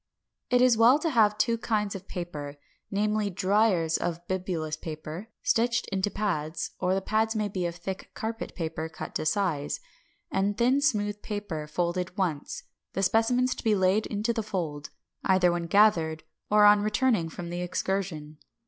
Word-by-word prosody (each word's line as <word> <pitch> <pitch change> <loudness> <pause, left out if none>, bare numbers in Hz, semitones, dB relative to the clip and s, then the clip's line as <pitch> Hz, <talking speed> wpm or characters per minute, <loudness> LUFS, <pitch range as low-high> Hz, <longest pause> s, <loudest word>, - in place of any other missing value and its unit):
563. 250 - +4
It 250 - +5
is 245 -3 +4
well 240 +5 +7
to 325 +2 -1
have 210 -4 +4
two 230 +1 +1
kinds 210 -3 0
of 195 0 -8
paper, 150 -6 -6 0.3
namely, 210 +1 0
driers 185 -3 +2
of 170 0 -3
bibulous 180 -5 -2
paper, 155 +5 -7 0.2
stitched 230 0 +2
into 195 +1 0
pads 170 -7 -2
(or 185 0 +1
the 195 - -1
pads 220 +2 +1
may 210 -1 0
be 185 -3 -2
of 170 - -6
thick 185 +3 -6
carpet 225 +1 -5
paper, 160 -1 -3
cut - - -8
to 155 - -1
size) 155 -4 0 0.5
and 200 +1 0
thin 255 +4 +3
smooth 210 -7 0
paper, 200 -8 -4
folded 180 +4 -2
once; 170 -7 -2 0.3
the 195 - -1
specimens 245 +5 +3
to - - -9
be 220 -3 +3
laid 190 +3 +2
into 215 +3 -1
the 225 - -1
fold, 170 -9 -4 0.3
either 185 -2 +4
when 170 -1 -2
gathered 165 -6 +3 0.3
or 210 0 +6
on 205 0 +7
returning 215 -4 +1
from 170 +1 -7
the 175 0 -3
excursion. 175 -4 -3
195 Hz, 170 wpm, -28 LUFS, 170-215 Hz, 0.5 s, well